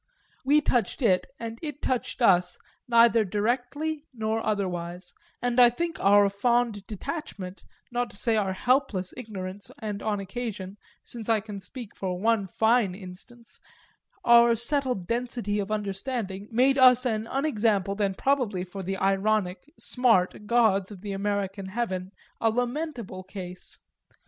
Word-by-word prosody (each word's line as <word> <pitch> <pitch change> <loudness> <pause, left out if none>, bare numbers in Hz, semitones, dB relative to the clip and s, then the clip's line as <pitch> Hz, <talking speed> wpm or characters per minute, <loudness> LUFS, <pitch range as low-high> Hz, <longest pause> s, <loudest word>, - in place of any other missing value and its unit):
We 290 +3 +4
touched 250 0 0
it 185 -5 +3
and 230 0 -6
it 295 -3 -5
touched 255 0 -2
us 180 -4 +4 0.3
neither 235 -1 +5
directly 250 - -2
nor 220 -2 -2
otherwise, 180 -3 -3 0.3
and 245 0 +1
I 245 -1 +9
think 330 +7 -3
our 205 +1 +6
fond 220 0 0
detachment, 210 - -6 0.3
not 245 0 -1
to - - -12
say 230 +1 +1
our 195 -3 +1
helpless 245 -5 +1
ignorance 200 -5 -6
and 210 -2 -5
on 210 -2 -1
occasion 200 -1 -5 0.3
(since 230 -2 -7
I 225 -1 +4
can 205 -1 -7
speak 235 +2 -10
for 185 -2 -3
one 220 -1 +2
fine 220 -1 +2
instance) 200 +5 -11 0.6
our 235 0 +7
settled 250 -4 0
density 235 -2 -2
of 205 +1 -3
understanding, 205 -1 -3
made 260 +4 +3
us 250 -1 +7
an 220 -2 -1
unexampled 215 -8 0
and 195 -2 0
probably, 250 -10 +1
for 190 +2 -7
the 190 +1 -3
ironic 195 +4 0
"smart" 210 -5 +1
gods 215 -5 +3
of 195 -3 -10
the 205 0 -5
American 195 -1 -2
heaven, 190 -3 -3 0.3
a 225 - +3
lamentable 245 - -3
case. 185 -1 -8
215 Hz, 140 wpm, -27 LUFS, 195-245 Hz, 0.6 s, I